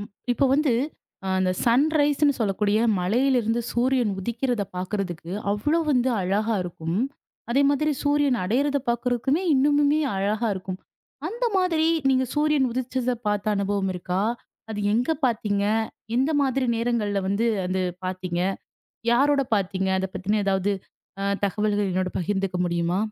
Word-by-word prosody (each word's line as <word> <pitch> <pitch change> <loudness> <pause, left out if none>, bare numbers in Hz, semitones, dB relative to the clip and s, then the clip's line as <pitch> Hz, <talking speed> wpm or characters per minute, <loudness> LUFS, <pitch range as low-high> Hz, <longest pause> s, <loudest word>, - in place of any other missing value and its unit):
ம். 205 - -7 0.2
இப்போ 260 - +1
வந்து 290 -2 +2 0.7
அந்த 185 -1 +2
சன்ரைஸ்ன்னு 290 +3 +3
சொல்லக்கூடிய 210 -1 +1 0.2
மலையிலிருந்து 235 +3 +2
சூரியன் 245 -3 +1
உதிக்கிறதை 235 +1 -1
பாக்குறதுக்கு 180 -2 -4 0.2
அவ்வளவு 295 +11 +1
வந்து 255 -2 +2
அழகா 210 +5 0
இருக்கும். 170 -1 -4 0.5
அதே 275 +4 +3
மாதிரி 300 +2 +1
சூரியன் 290 -3 +2
அடையறதை 280 +7 +1
பாக்குறதுக்குமே 245 +6 0
இன்னுமுமே 290 +2 +3 0.2
அழகா 210 +4 0
இருக்கும். 185 0 -6 0.5
அந்த 475 +4 -3
மாதிரி 335 -4 +2 0.2
நீங்க 260 -1 +3
சூரியன் 295 -3 +2
உதிச்சத 255 +1 -1 0.2
பார்த்த 205 0 -1
அனுபவம் 200 -1 0
இருக்கா? 180 +2 -2 0.5
அது 210 -1 -3
எங்க 240 +7 +1
பாத்தீங்க? 210 -4 0 0.5
எந்த 265 +5 +2
மாதிரி 265 -1 +1
நேரங்கள்ல 225 -4 0
வந்து 205 +4 +1 0.2
அது 185 +1 -1 0.2
பாத்தீங்க? 185 -1 -3 0.7
யாரோட 280 +3 +4
பாத்தீங்க? 190 -1 -1
அதைப் 190 0 -4
பத்தின 190 +3 0
அ - - -2
ஏதாவது 195 +1 +1 0.5
அ - - -1 0.2
தகவல்கள் 205 0 0
என்னோட 185 0 0
பகிர்ந்துக்க 195 +1 -1
முடியுமா? 170 +1 0
225 Hz, 130 wpm, -24 LUFS, 195-270 Hz, 0.7 s, யாரோட